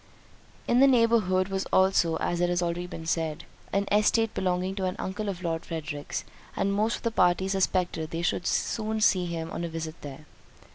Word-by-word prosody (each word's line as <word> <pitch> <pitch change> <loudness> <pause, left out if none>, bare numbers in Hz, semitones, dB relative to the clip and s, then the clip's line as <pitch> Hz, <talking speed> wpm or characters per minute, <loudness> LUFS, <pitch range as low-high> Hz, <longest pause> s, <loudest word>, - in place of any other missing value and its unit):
In 240 - +3
the 275 - +7
neighbourhood 225 -7 +3
was 195 0 -2
also 190 -3 +3
(as 175 0 -1
it 175 - +2
has 175 0 +1
been 175 - +1
already 175 -2 -6
said) 160 -2 -1 0.3
an 200 +1 +1
estate 215 +2 +3
belonging 185 0 -1
to 195 -1 -2
an 185 - -2
uncle 205 +2 -3
of 185 -2 -5
Lord 165 -1 -2
Frederick's, 155 -3 -5 0.3
and 200 - 0
most 215 +3 +1
of - - -9
the 230 - 0
party 185 -2 +3
suspected 185 -4 0
they 165 +1 -4
should 175 - 0
soon 220 -1 -1
see 185 -4 +3
him 165 -1 -4
on - - -4
a 170 - -3
visit 160 -1 -6
there. 145 +1 -9
185 Hz, 195 wpm, -27 LUFS, 165-200 Hz, 0.3 s, the